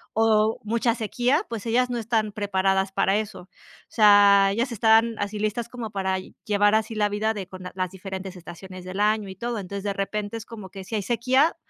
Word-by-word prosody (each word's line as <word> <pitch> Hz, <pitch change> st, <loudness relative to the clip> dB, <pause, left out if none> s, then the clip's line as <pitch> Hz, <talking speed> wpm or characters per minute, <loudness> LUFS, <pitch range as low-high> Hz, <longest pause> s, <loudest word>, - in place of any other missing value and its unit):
o, 220 Hz, 0 st, +3 dB
mucha 230 Hz, +2 st, +1 dB
sequía, 245 Hz, -, 0 dB
pues 230 Hz, -1 st, -5 dB
ellas 245 Hz, +2 st, +2 dB
no 240 Hz, -, -2 dB
están 220 Hz, -2 st, -1 dB
preparadas 195 Hz, -1 st, 0 dB
para 195 Hz, +1 st, +2 dB
eso. 215 Hz, -1 st, -4 dB
O 185 Hz, -, -23 dB, 0.4 s
sea, 205 Hz, -2 st, +6 dB
ellas 235 Hz, +4 st, -1 dB
están 225 Hz, +1 st, +4 dB
así 205 Hz, +1 st, -3 dB
listas 215 Hz, +3 st, -2 dB
como 235 Hz, -3 st, -6 dB
para 190 Hz, -1 st, -1 dB, 0.3 s
llevar 205 Hz, -1 st, +3 dB
así 220 Hz, +1 st, 0 dB
la 210 Hz, -1 st, +1 dB
vida 215 Hz, +2 st, 0 dB
de 195 Hz, -4 st, -6 dB
con 185 Hz, 0 st, -10 dB
las 185 Hz, -1 st, -2 dB
diferentes 190 Hz, 0 st, -7 dB
estaciones 180 Hz, +1 st, -10 dB
del 185 Hz, +2 st, -6 dB
año 210 Hz, 0 st, +2 dB
y 190 Hz, -, -8 dB
todo. 235 Hz, +3 st, -3 dB
Entonces, 200 Hz, 0 st, -6 dB
de 200 Hz, -, -1 dB
repente 205 Hz, +2 st, -3 dB
es 225 Hz, -, -9 dB
como 210 Hz, -5 st, -10 dB
que 195 Hz, 0 st, -9 dB
si 190 Hz, -, -11 dB
hay 210 Hz, -, 0 dB
sequía, 255 Hz, -, +2 dB
210 Hz, 205 wpm, -24 LUFS, 195-225 Hz, 0.4 s, sea